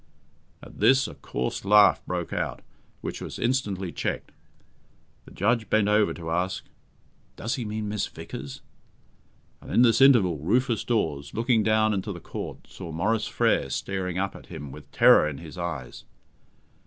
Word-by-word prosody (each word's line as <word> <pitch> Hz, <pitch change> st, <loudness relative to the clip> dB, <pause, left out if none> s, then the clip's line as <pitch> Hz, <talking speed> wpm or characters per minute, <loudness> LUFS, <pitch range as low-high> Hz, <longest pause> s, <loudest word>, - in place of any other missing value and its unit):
At -, -, -13 dB
this, 135 Hz, 0 st, +4 dB
a -, -, -8 dB
coarse 60 Hz, -, -4 dB
laugh 100 Hz, -7 st, +5 dB
broke 90 Hz, -1 st, -3 dB
out, -, -, -3 dB, 0.4 s
which -, -, -5 dB
was -, -, -6 dB
instantly 105 Hz, -8 st, -1 dB
checked. -, -, -3 dB, 0.9 s
The -, -, -14 dB
judge 110 Hz, +3 st, 0 dB
bent 110 Hz, -2 st, +3 dB
over 105 Hz, 0 st, +3 dB
to 80 Hz, -2 st, -6 dB
ask, 90 Hz, +3 st, -1 dB, 0.7 s
"Does 115 Hz, +3 st, -3 dB
he 125 Hz, -6 st, -3 dB
mean 105 Hz, 0 st, -3 dB
Miss 105 Hz, -1 st, -2 dB
Vickers?" 70 Hz, -1 st, -8 dB, 1.0 s
and -, -, -10 dB
in 120 Hz, -, +5 dB
this 115 Hz, +1 st, +4 dB
interval 110 Hz, -, +5 dB
Rufus 115 Hz, -, +1 dB
Dawes, 75 Hz, -12 st, -1 dB
looking 115 Hz, 0 st, +2 dB
down 110 Hz, 0 st, +3 dB
into 100 Hz, +1 st, -2 dB
the 90 Hz, -, -7 dB
Court, -, -, -7 dB
saw 85 Hz, -, -9 dB
Maurice 105 Hz, +7 st, 0 dB
Frere 70 Hz, -, +1 dB
staring 90 Hz, +5 st, -3 dB
up 100 Hz, +1 st, -2 dB
at -, -, -12 dB
him 70 Hz, -2 st, -8 dB
with -, -, -12 dB
terror 75 Hz, -, +6 dB
in 70 Hz, -, -7 dB
his 80 Hz, +1 st, -10 dB
eyes. 85 Hz, -9 st, -5 dB
100 Hz, 160 wpm, -26 LUFS, 85-110 Hz, 1.0 s, terror